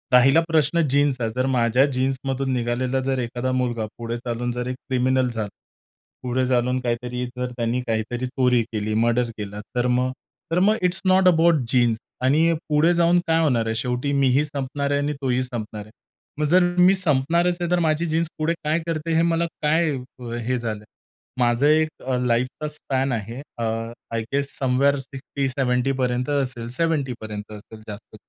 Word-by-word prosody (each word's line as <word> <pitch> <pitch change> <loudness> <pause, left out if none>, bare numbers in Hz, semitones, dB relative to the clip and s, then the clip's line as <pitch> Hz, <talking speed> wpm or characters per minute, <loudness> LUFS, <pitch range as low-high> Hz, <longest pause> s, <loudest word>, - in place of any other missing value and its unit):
राहिला 135 +6 +6
प्रश्न 160 0 +2
जीन्सचा. 135 -4 +2
जर 130 +1 +1
माझ्या 120 +3 +4
जीन्समधून 135 0 -1
निघालेला 125 +2 0
जर 135 -1 0
एखादा 125 +1 -2
मुलगा 120 -3 -1
पुढे 115 0 -4
चालून 120 0 -3
जर 125 +1 -4
एक 130 - -3
क्रिमिनल 130 0 +2
झाला. 110 -3 -3 0.8
पुढे 130 +1 0
चालून 125 0 +1
काहीतरी 125 0 -2
जर 125 0 -3
त्याने 120 +1 0
काहीतरी 115 +2 -2
चोरी 125 -2 +2
केली, 105 0 -2
मर्डर 120 +2 +2
केला, 105 -1 -6 0.2
तर 125 0 +1
मग 125 +1 +1 0.4
तर 170 - +2
मग 205 +4 +4
इट्स 180 0 +1
नॉट 185 0 +5
अबाउट 170 -1 +5
जीन्स 120 -2 +2 0.3
आणि 155 +6 +4 0.2
पुढे 155 +3 +4
जाऊन 170 +1 +4
काय 165 0 +3
होणार 125 -8 +2
आहे. 110 0 -1
शेवटी 125 +4 -1
मीही 135 0 +3
संपणार 140 0 -3
आहे 140 - +2
आणि 145 +1 -1
तोही 130 -2 +1
संपणार 110 -4 -6
आहे. 105 - -17 0.5
मग 150 - +2
जर 180 +5 +5 0.2
मी 180 +2 +7
संपणारच 170 +1 +2
आहे 175 - -1
तर 180 - +3
माझी 160 0 +1
जीन्स 165 +1 0
पुढे 155 +2 +1
काय 155 +2 +1
करते 165 0 -2
हे 165 - +4
मला 170 0 +2 0.2
काय 160 +2 +2 0.3
अ, 120 -2 -7
हे 120 +2 -1
झालंय. 110 -3 -4 0.5
माझं 120 +3 +3
एक 155 +1 +4 0.2
अ, 130 -1 +1
लाईफचा 125 +5 0
स्पॅन 135 -3 -2
आहे. 115 +2 -4 0.2
अ, 120 - -3 0.5
आय 115 - 0
गेस 140 0 0
समव्हेअर 135 +2 +2
60-70 135 -1 -1
पर्यंत 125 +1 -1
असेल, 130 -5 -1
70 155 -6 0
पर्यंत 105 -1 -7
असेल 110 +1 -13
जास्त. 105 0 -10
130 Hz, 175 wpm, -23 LUFS, 120-150 Hz, 0.8 s, मी